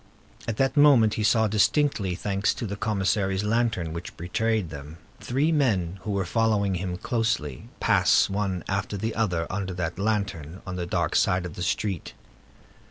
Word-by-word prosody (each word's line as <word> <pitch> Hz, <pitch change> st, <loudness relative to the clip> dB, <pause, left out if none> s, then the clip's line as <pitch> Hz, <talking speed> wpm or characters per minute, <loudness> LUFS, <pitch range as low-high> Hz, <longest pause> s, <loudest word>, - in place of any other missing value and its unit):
At 115 Hz, -2 st, -2 dB
that 135 Hz, -1 st, +1 dB
moment 140 Hz, -7 st, +6 dB
he 110 Hz, -, -2 dB
saw 110 Hz, +1 st, +3 dB
distinctly, 105 Hz, -, +2 dB
thanks 100 Hz, +2 st, 0 dB
to -, -, -4 dB
the 100 Hz, -1 st, -4 dB
commissary's 100 Hz, -3 st, 0 dB
lantern, 110 Hz, -6 st, 0 dB
which 85 Hz, +1 st, -7 dB
betrayed 105 Hz, +1 st, -1 dB
them, 75 Hz, +2 st, -9 dB, 0.2 s
three 140 Hz, +6 st, 0 dB
men 100 Hz, -, +1 dB
who -, -, -6 dB
were 100 Hz, -2 st, 0 dB
following 105 Hz, -1 st, +1 dB
him 90 Hz, 0 st, -3 dB
closely, 110 Hz, -, -2 dB
pass, -, -, +4 dB
one 95 Hz, -3 st, -2 dB
after 100 Hz, +1 st, -2 dB
the 110 Hz, +3 st, -2 dB
other, 90 Hz, -7 st, 0 dB
under 95 Hz, -1 st, -3 dB
that 85 Hz, 0 st, -3 dB
lantern, 95 Hz, -6 st, -2 dB
on 90 Hz, -1 st, -5 dB
the 90 Hz, -1 st, -3 dB
dark 85 Hz, -3 st, -1 dB
side 90 Hz, 0 st, +2 dB
of 85 Hz, -, -6 dB
the -, -, -8 dB
street. 95 Hz, -1 st, -2 dB
100 Hz, 165 wpm, -26 LUFS, 90-110 Hz, 0.2 s, moment